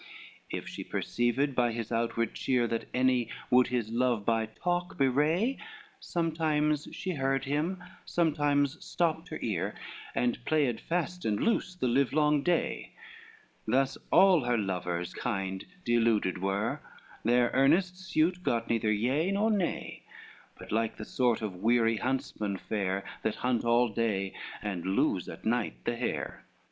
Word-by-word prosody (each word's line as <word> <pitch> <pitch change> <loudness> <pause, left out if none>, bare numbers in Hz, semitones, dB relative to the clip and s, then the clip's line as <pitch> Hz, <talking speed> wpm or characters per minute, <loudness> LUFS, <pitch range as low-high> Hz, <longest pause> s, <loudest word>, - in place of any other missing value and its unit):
XCV - - -1
If - - -8
she - - -6
perceived 125 +4 0
by 120 -2 +2
his 115 -1 -4
outward 115 -1 0
cheer, 125 -2 +1
That 115 -1 -2
any 125 -1 +2 0.2
would 125 0 +6
his 120 -3 -2
love 120 -3 +1
by 115 -1 +1
talk 175 - -2
bewray, 150 - +2 0.4
Sometimes 155 -3 0
she 185 - -4
heard 135 -3 0
him, 160 +7 -1 0.2
sometimes 145 -3 +1
stopped 165 -1 -1
her 155 - -4
ear, 100 -2 -1 0.4
And 120 -1 0
played 140 -5 +1
fast 180 +1 -2
and 105 -2 0
loose 200 -5 0
the 130 - -1
livelong 145 +4 +3
day: 175 +2 -1 0.7
Thus 135 +4 +2 0.2
all 190 -6 +6
her 120 -1 +2
lovers 90 -3 -2
kind 95 -1 -3 0.2
deluded 115 -6 +2
were, 95 +3 -1 0.4
Their 120 +1 +3
earnest 180 +7 +3
suit 180 -1 +1
got 115 -9 0
neither 110 -2 +2
yea 130 - +1
nor 210 +3 +2
nay; 195 -5 -2 0.6
But - - -11
like 115 0 0
the 110 - -6
sort 120 -2 +1
of 100 -4 -4
weary 115 0 +3
huntsmen 110 -5 -2
fare, 95 -1 -2 0.2
That 110 - -1
hunt 125 -1 0
all 120 +1 +4
day, 100 -3 -1 0.3
and 100 -5 -3
lose 95 +2 +1
at - - -10
night 120 +2 -1
the 120 - 0
hare. 120 +1 -3
125 Hz, 145 wpm, -30 LUFS, 110-155 Hz, 0.7 s, would